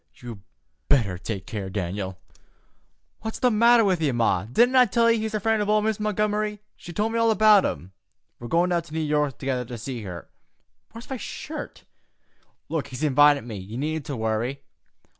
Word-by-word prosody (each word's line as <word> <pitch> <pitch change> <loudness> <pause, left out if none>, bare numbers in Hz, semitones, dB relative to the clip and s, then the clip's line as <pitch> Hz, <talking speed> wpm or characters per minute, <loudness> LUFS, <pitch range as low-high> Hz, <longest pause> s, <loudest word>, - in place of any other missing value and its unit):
"You 115 -5 -10 0.5
better 105 -10 +2
take 95 +1 -5
care, 100 -3 -5
Dan'l." 95 0 -4 1.0
"What's 220 0 -5
the 250 - +2
matter 230 +1 +5
with 185 -4 +1
ye, 150 -3 +2
Ma? 115 -6 +1
Didn't 240 - +3
I 255 -1 +7
tell 230 +2 +3
you 230 - +2
he's 220 0 -3
a - - 0
friend 220 +1 +1
o' 210 +1 +2
Miss 215 0 -1
Montgomery? 210 0 -1 0.2
She 175 - -11
told 210 +6 -1
me 230 - 0
all 230 0 +3
about 215 -2 +5
him. 85 +7 -4 0.5
We're 120 - -7
goin' 175 +6 +2
down 170 -1 +2
to 160 -1 -11
New - - 0
York 150 -4 0
together 130 -2 -2
to 120 0 -7
see 120 +1 -6
her. 90 -5 -8 0.6
Where's 230 +2 -11
my 265 - -2
shirt? 305 +7 -7 1.0
He's 125 +3 -7
invited 145 -1 +5
me. 115 -3 -7
You 100 +5 -8
needn't 155 +2 -3
to 140 -4 -4
worry. 110 +5 -2
150 Hz, 185 wpm, -24 LUFS, -, 1.0 s, I